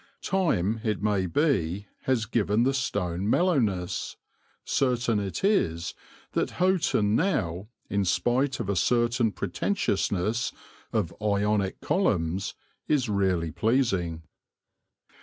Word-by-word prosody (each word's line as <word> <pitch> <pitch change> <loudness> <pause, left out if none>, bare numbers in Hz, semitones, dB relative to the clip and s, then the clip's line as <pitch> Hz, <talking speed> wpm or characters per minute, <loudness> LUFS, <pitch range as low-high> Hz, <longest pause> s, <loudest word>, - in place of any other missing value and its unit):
Time, 115 - +1
it 105 -3 -1
may 100 -3 +1
be, 100 - +1 0.2
has 125 -4 +1
given 110 0 +1
the 135 +2 +2
stone 100 -7 -1
mellowness; 115 - +1 0.5
certain 120 -4 +1
it 100 - -4
is 90 - +1 0.4
that - - -1
Houghton 170 - +2
now, 105 - 0 0.2
in 100 0 0
spite 130 +8 +1
of - - -3
a 100 - 0
certain 120 +4 +2
pretentiousness 100 - -1 0.4
of - - -1
Ionic 105 -1 0
columns, 95 - 0 0.3
is 135 -6 +1
really 95 -5 +1
pleasing. 95 - 0
105 Hz, 105 wpm, -27 LUFS, 95-130 Hz, 0.5 s, the